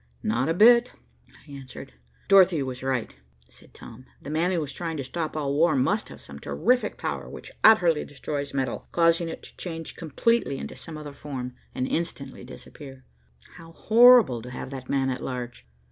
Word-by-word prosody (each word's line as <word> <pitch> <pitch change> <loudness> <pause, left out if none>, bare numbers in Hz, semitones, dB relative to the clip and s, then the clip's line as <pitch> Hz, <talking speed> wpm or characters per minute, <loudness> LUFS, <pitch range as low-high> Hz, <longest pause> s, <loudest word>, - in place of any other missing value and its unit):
"Not 120 +7 0
a 165 - +1
bit," 235 +4 +6 0.4
I - - -19
answered. 135 - -10 0.3
"Dorothy 185 -6 +5
was 130 -1 -6
right," 130 -3 -2 0.3
said - - -17
Tom. 120 +2 -13
"The 145 - -8
man 165 +4 +1
who 170 -4 0
is 140 -2 -7
trying 165 +1 -4
to 140 - -3
stop 155 +4 -4
all 140 -2 -1
war 165 +4 +3
must 190 +12 0
have - - -11
some - - -11
terrific 250 0 0
power - - -4
which - - -10
utterly 175 -8 +5
destroys 145 0 -5
metal, 130 -3 -3
causing 170 0 +2
it - - -8
to - - -12
change 165 -3 -6
completely 165 - 0
into - - -7
some 160 -2 -10
other 150 -2 -8
form, 130 -3 -6 0.2
and 130 - -1
instantly 140 -6 -4
disappear. 135 +1 -12 0.5
How 165 -1 -13
horrible 230 - +6
to 125 - -9
have 125 +1 -7
that 130 -2 -8
man 135 -1 +1
at 130 - -5
large. 125 - -6
145 Hz, 180 wpm, -25 LUFS, 130-170 Hz, 0.5 s, bit